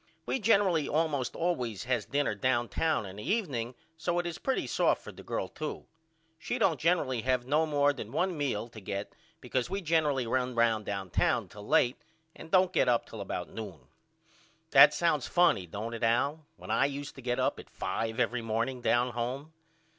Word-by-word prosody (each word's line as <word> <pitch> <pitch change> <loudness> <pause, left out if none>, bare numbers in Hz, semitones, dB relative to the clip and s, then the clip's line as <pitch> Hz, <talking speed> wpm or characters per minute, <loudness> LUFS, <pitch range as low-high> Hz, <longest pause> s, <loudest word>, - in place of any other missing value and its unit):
We 265 - -1
generally 195 - +3
almost 150 -4 0
always 125 - -1
has 125 -1 -1
dinner 140 -4 0
downtown 120 +5 0
in 95 +1 -9
the 105 - -7
evening 130 - -1 0.2
so 175 +2 -1
it 175 - 0
is 170 -2 -4
pretty 265 - -1
soft - - +1
for - - -8
the - - -12
girl - - -3
too. - - -6 0.5
She - - -3
don't 180 - +2
generally 150 -8 +1
have 125 0 0
no 150 +4 +2
more 145 -1 +3
than 115 -5 -7
one 185 +4 0
meal 135 -7 -1
to 110 -2 -11
get 100 +1 -5 0.3
because 125 -2 -2
we 195 - -2
generally 155 -7 +1
run 125 +1 -1
round 115 -2 +2
downtown 95 -3 0
till 105 0 -11
late 120 +1 +3 0.4
and 160 - -11
don't 185 +1 +4
get 130 - +3
up 120 -1 +2
till 110 - -8
about 90 -2 -5
noon. 95 - -8 0.8
That - - +9
sounds 155 -6 +1
funny 175 - +3
don't 105 +7 -5
it 115 - -6
Al, 140 +7 +1
when - - -8
I - - +3
used 145 +1 -6
to - - -8
get 125 0 -1
up - - 0
at - - -12
5 110 +1 -3
every 125 -1 +1
morning 115 +3 -2
down 120 +1 +2
home. 130 +6 -4
130 Hz, 190 wpm, -30 LUFS, 115-160 Hz, 0.8 s, That